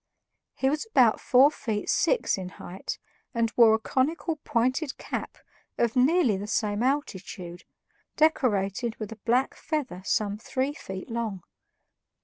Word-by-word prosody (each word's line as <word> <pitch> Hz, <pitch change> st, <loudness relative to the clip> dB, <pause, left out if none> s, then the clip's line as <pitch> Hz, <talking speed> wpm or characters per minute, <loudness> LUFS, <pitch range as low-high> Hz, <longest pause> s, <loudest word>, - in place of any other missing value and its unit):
He 265 Hz, -, 0 dB
was 300 Hz, +9 st, 0 dB
about 245 Hz, -, +4 dB
four 265 Hz, +4 st, +6 dB
feet 215 Hz, -8 st, -3 dB
six -, -, +2 dB
in 185 Hz, -2 st, -6 dB
height 185 Hz, +2 st, -6 dB, 0.4 s
and 230 Hz, -1 st, +1 dB
wore 225 Hz, -2 st, +7 dB
a -, -, +1 dB
conical 310 Hz, +8 st, -1 dB
pointed 260 Hz, +2 st, 0 dB
cap -, -, -5 dB, 0.4 s
of 235 Hz, 0 st, +1 dB
nearly 260 Hz, -, +4 dB
the 200 Hz, +2 st, -5 dB
same 210 Hz, -1 st, 0 dB
altitude, 190 Hz, -, -3 dB, 0.5 s
decorated 235 Hz, -7 st, +1 dB
with 215 Hz, -1 st, -6 dB
a 225 Hz, -, -8 dB
black 250 Hz, +3 st, +2 dB
feather 285 Hz, -, -3 dB
some 205 Hz, +1 st, 0 dB
three 260 Hz, +4 st, -2 dB
feet 190 Hz, -6 st, -8 dB
long. 220 Hz, -6 st, -3 dB
235 Hz, 135 wpm, -27 LUFS, 205-270 Hz, 0.5 s, wore